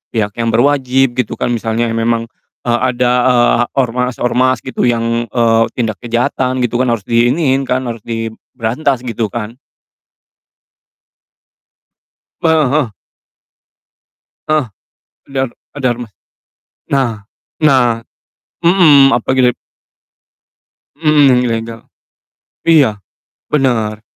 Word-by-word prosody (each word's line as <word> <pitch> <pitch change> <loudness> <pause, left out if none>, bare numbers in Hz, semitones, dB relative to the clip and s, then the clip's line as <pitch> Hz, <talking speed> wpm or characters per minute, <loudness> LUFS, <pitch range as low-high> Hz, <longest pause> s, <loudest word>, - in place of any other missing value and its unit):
pihak 105 -2 0
yang 115 - 0
berwajib 130 +1 +2
gitu 125 - -1
kan 120 - -2
misalnya 115 0 -1
memang, 115 0 0 0.4
eee, 120 -1 0
ada, 125 -1 +1 0.2
eee, 120 -1 +3
ormas-ormas 125 0 0
gitu 130 -2 -1
yang, 115 0 0
eee, 115 0 +2
tindak 110 -4 -2
kejahatan 125 +2 -1
gitu 120 0 -1
kan 130 - +1
harus 115 -4 -1
diiniin 130 +4 +1
kan, 130 +1 0
harus 115 -2 -5
diberantas, 115 +3 -3
gitu 115 -2 -2
kan? 115 +3 -6 2.9
Heeh 155 -5 +3
heeh. 145 -7 +1 1.6
Heeh. 155 -3 +1 0.7
Dar 135 -1 -1 0.2
ada 140 -3 -2
ormas 120 -3 -9 0.7
nah 120 -7 -1 0.4
nah, 125 -5 +3 0.7
mmm, 155 -7 +6
apa 120 - -2
gidep 125 -2 +3 1.4
Mhm, 150 -2 +3
yang 125 -1 +4
ilegal. 115 0 -3 0.9
Iya, 140 -11 +4 0.5
bener. 115 -7 0
120 Hz, 100 wpm, -15 LUFS, 115-130 Hz, 2.9 s, mmm